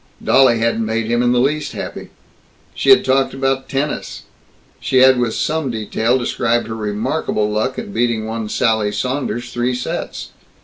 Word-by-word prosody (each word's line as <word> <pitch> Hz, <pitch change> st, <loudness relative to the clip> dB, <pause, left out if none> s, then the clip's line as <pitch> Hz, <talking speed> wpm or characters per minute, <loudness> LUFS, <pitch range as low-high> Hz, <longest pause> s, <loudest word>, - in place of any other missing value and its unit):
Dolly 130 Hz, -3 st, +5 dB
hadn't 115 Hz, 0 st, 0 dB
made 110 Hz, +1 st, -2 dB
him 120 Hz, 0 st, +2 dB
in 120 Hz, 0 st, +2 dB
the 125 Hz, -, +2 dB
least 150 Hz, +4 st, 0 dB
happy. -, -, -7 dB, 0.6 s
She -, -, -1 dB
had 400 Hz, -, +7 dB
talked 135 Hz, 0 st, +1 dB
about 135 Hz, 0 st, -1 dB
tennis; 140 Hz, +2 st, -3 dB, 0.6 s
she 130 Hz, -, 0 dB
had 130 Hz, 0 st, +6 dB
with 120 Hz, -2 st, 0 dB
some 155 Hz, -3 st, -1 dB
detail 115 Hz, +2 st, 0 dB
described 120 Hz, -1 st, 0 dB
her 110 Hz, -, -5 dB
remarkable 105 Hz, 0 st, -1 dB
luck 110 Hz, +5 st, -1 dB
in -, -, -6 dB
beating 115 Hz, -1 st, 0 dB
one 110 Hz, -1 st, -4 dB
Sally 110 Hz, -3 st, +1 dB
Saunders 125 Hz, -1 st, -3 dB
three 120 Hz, +1 st, 0 dB
sets. 125 Hz, -, -5 dB
120 Hz, 165 wpm, -18 LUFS, 110-130 Hz, 0.6 s, had